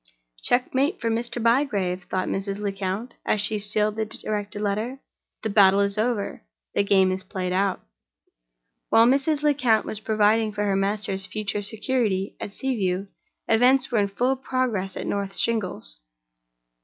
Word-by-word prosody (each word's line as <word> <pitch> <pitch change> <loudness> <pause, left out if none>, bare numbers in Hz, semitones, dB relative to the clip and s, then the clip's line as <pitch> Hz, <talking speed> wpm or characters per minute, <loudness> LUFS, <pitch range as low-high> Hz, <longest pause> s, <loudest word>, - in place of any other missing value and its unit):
"Checkmate 260 +6 +1
for 230 -1 -1
Mr. 235 +1 -2
Bygrave!" 215 -7 +1
thought 185 +1 -2
Mrs. 195 0 -2
Lecount, 200 +3 -3
as 215 - +1
she 210 +1 +1
sealed 210 +1 0
and 220 -1 -1
directed 210 -1 -3
the 205 - -3
letter. 215 +6 -2 0.4
"The 220 - -1
battle 200 -1 +6
is 200 0 +1
over—the 200 - -2
game 190 -2 +4
is 185 0 -2
played 185 -1 -3
out." 195 0 +1 1.1
While 225 - +6
Mrs. 280 +4 +2
Lecount 260 -7 +3
was 210 - -3
providing 215 0 +2
for 205 0 -2
her 200 -1 +1
master's 195 -1 -1
future 210 -1 -3
security 210 -2 -1
at 200 - -7
Sea 265 -1 -1
View, 190 -1 -1 0.4
events 250 +4 +4
were 235 - +2
in 200 - +2
full 245 +7 0
progress 255 -8 -2
at - - -4
North 200 -1 -2
Shingles. 185 - -1
210 Hz, 155 wpm, -24 LUFS, 195-235 Hz, 1.1 s, battle